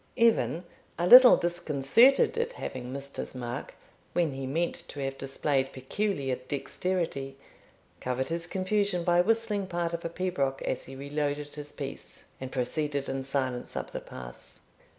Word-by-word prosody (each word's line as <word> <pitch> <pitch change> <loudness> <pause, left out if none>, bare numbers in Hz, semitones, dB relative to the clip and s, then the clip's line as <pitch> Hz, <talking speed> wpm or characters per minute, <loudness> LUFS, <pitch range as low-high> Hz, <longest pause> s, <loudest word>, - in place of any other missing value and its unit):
Evan, 225 -7 +3 0.3
a 175 - 0
little 250 +5 +10
disconcerted 175 - +3
at 470 +1 -1
having 125 - -6
missed 140 +1 -6
his - - -5
mark, 120 -1 -5 0.4
when 170 -5 +1
he 135 0 -4
meant 165 +6 -1
to 145 - -8
have 135 -1 -2
displayed 135 0 -1
peculiar 135 -1 -2
dexterity, 140 -3 -2 0.6
covered 130 +1 -2
his 170 +1 -2
confusion 190 0 0
by 175 0 +4
whistling 215 -1 +1
part 170 -1 -2
of 170 - -3
a 170 - -2
pibroch 165 -7 -1
as - - -2
he 135 - -9
reloaded 145 +1 -3
his 150 -1 -8
piece, 140 -1 -8 0.2
and 130 0 -6
proceeded 140 +2 -1
in 135 0 -2
silence 130 -2 -2
up - - -4
the - - -5
pass. 60 -1 -10
145 Hz, 150 wpm, -29 LUFS, 135-180 Hz, 0.6 s, little